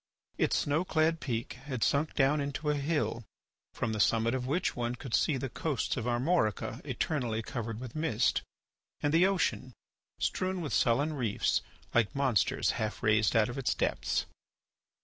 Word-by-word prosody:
Its - - +2
snow 145 +4 +1
clad 160 -2 +1
peak 120 -6 -3 0.2
had 130 -4 -1
sunk 150 +2 +1
down 145 +1 +3
into 145 +2 -1
a - - +1
hill 145 -5 -1 0.5
from 110 - -1
the 110 - -3
summit 115 +2 +3
of 130 -1 -2
which 160 +7 0
one 120 0 -2
could 125 -1 -8
see 150 - +3
the 135 - -3
coasts 140 +2 -2
of 120 -2 -3
Armorica 120 - 0
eternally 120 -7 -1
covered 115 -1 -4
with 125 -2 -8
mist, 125 -7 +1 0.6
and 145 - +1
the 175 +3 +6
ocean 175 -9 0 0.4
strewn 185 0 -1
with 155 -5 -3
sullen 140 +6 +2
reefs 120 -8 0 0.3
like 120 0 +2
monsters 135 -7 +2
half 110 +2 -3
raised 110 0 +3
out 110 -1 +4
of 125 +3 -5
its 130 - 0
depths. - - 0
130 Hz, 165 wpm, -31 LUFS, 115-150 Hz, 0.6 s, the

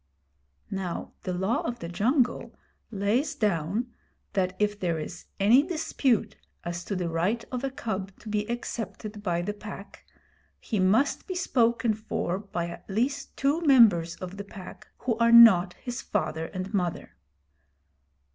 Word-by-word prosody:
Now 190 -3 -4
the 185 - -3
Law 190 +6 0
of 240 +1 -3
the 170 - -6
Jungle 240 - 0 0.3
lays 215 +7 0
down 210 +4 -1 0.4
that 185 -1 0
if 210 0 0
there 170 -4 0
is 160 +3 -7
any 220 +7 +6
dispute 300 - 0 0.3
as 175 0 -4
to 200 - -3
the 180 -2 -1
right 180 +8 0
of 250 0 -3
a 270 - 0
cub 200 -7 -4
to - - -13
be 210 0 -1
accepted 225 -3 -5
by 175 -4 -1
the 205 +3 -2
Pack, 205 -1 -10 0.6
he 215 - -2
must 215 +10 +2
be 370 - -4
spoken 235 -8 +2
for 215 -3 -3
by 175 -4 -4
at 170 - -10
least 245 +8 -2
two 285 +5 +1
members 215 - +5
of 185 +1 -8
the 200 - -5
Pack 200 -2 -11
who 240 -3 -1
are 235 0 +4
not 225 -6 +8
his 245 0 -6
father 160 -5 -2
and 185 +3 -6
mother. 180 -4 -2
210 Hz, 155 wpm, -27 LUFS, 185-235 Hz, 0.6 s, not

